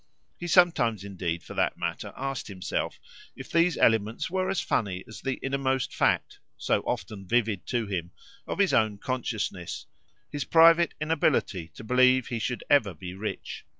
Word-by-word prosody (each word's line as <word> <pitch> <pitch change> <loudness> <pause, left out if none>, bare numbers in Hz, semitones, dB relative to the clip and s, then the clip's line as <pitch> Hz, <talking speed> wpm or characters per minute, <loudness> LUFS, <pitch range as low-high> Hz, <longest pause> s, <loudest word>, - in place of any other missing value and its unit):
He 175 - -5
sometimes 140 - +3
indeed, 90 -4 -3
for - - -9
that - - 0
matter, - - -4
asked 135 -1 -3
himself 95 -3 -3 0.4
if - - -10
these 170 -1 +3
elements 110 +5 +2
were 185 0 0
as 195 - 0
funny 95 -5 -1
as 110 -2 -10
the 135 -1 -1
innermost 135 -1 -1
fact, - - +1 0.2
so - - +1
often 95 -3 -4
vivid 105 -7 0
to 120 -2 0
him, 90 -4 -3 0.4
of - - -3
his 200 -2 +3
own 110 -3 +2
consciousness 110 -7 -3 0.5
his 145 -2 -2
private 165 +2 +5
inability 150 - +1
to - - -10
believe 130 +2 +4
he 120 - -2
should 125 +2 -3
ever 110 - +3
be 90 +4 -7
rich. 105 +3 -5
120 Hz, 160 wpm, -27 LUFS, 100-145 Hz, 0.5 s, private